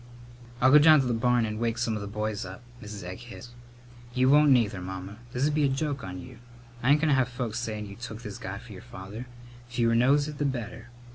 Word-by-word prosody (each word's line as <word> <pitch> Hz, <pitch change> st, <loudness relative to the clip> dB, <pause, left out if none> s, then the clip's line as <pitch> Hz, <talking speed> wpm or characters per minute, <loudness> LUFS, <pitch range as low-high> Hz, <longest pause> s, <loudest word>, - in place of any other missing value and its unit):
"I'll 130 Hz, +1 st, +5 dB
go 150 Hz, -, +9 dB
down 155 Hz, 0 st, +7 dB
to -, -, -2 dB
the 125 Hz, -, 0 dB
barn 120 Hz, 0 st, +2 dB
and 110 Hz, 0 st, -4 dB
wake 115 Hz, 0 st, 0 dB
some 115 Hz, -1 st, 0 dB
of 105 Hz, -, -3 dB
the 100 Hz, -, -5 dB
boys 105 Hz, 0 st, -3 dB
up," 95 Hz, +5 st, -9 dB, 0.2 s
Mrs. 105 Hz, -3 st, -8 dB
Egg 90 Hz, +1 st, -7 dB
hissed. 120 Hz, 0 st, -11 dB, 0.6 s
"You 130 Hz, +1 st, +4 dB
won't 150 Hz, +1 st, +6 dB
neither, 110 Hz, -7 st, +3 dB
Mamma. 95 Hz, +2 st, -7 dB
This'd 140 Hz, +4 st, 0 dB
be 150 Hz, 0 st, +2 dB
a 140 Hz, -, +3 dB
joke 140 Hz, -1 st, -2 dB
on 90 Hz, -1 st, -6 dB
you. 125 Hz, +2 st, -11 dB, 0.4 s
I 130 Hz, -, +1 dB
ain't 145 Hz, +1 st, +5 dB
goin' 160 Hz, -, +2 dB
to -, -, +4 dB
have 130 Hz, -2 st, +2 dB
folks 120 Hz, -2 st, -3 dB
sayin' 110 Hz, -3 st, -4 dB
you 100 Hz, 0 st, -10 dB
took 115 Hz, -1 st, -8 dB
this 105 Hz, -2 st, -7 dB
guy -, -, -5 dB
for -, -, -11 dB
your -, -, -10 dB
father. 105 Hz, +7 st, -9 dB, 0.4 s
Fewer 120 Hz, -1 st, +1 dB
knows 140 Hz, +5 st, +4 dB
it, 150 Hz, -1 st, -7 dB
the 145 Hz, -, +1 dB
better. 120 Hz, -3 st, -4 dB
120 Hz, 240 wpm, -27 LUFS, 105-130 Hz, 0.6 s, go